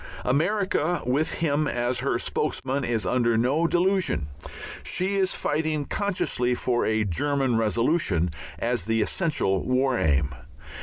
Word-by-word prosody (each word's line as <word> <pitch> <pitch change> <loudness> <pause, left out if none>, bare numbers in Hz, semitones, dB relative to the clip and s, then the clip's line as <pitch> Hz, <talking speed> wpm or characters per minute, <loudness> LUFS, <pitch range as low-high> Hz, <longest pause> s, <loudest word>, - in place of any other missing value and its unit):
America, 175 +3 +1
with 140 +6 +1
him 155 -2 0
as 120 0 -1
her - - 0
spokesman, 135 +1 -2
is 115 -3 -1
under 120 -2 +2
no 140 +8 +2
delusion; 180 - +1 0.6
she 190 +2 -1
is 190 -1 +1
fighting 155 -1 -1
consciously 155 -12 0
for 120 -1 0
a 110 0 +1
German 135 - 0
Revolution 115 - +1 0.3
as - - -1
the 115 0 +2
essential 105 - 0
War 130 0 +1
Aim. 70 -1 +2
130 Hz, 125 wpm, -25 LUFS, 115-160 Hz, 0.6 s, under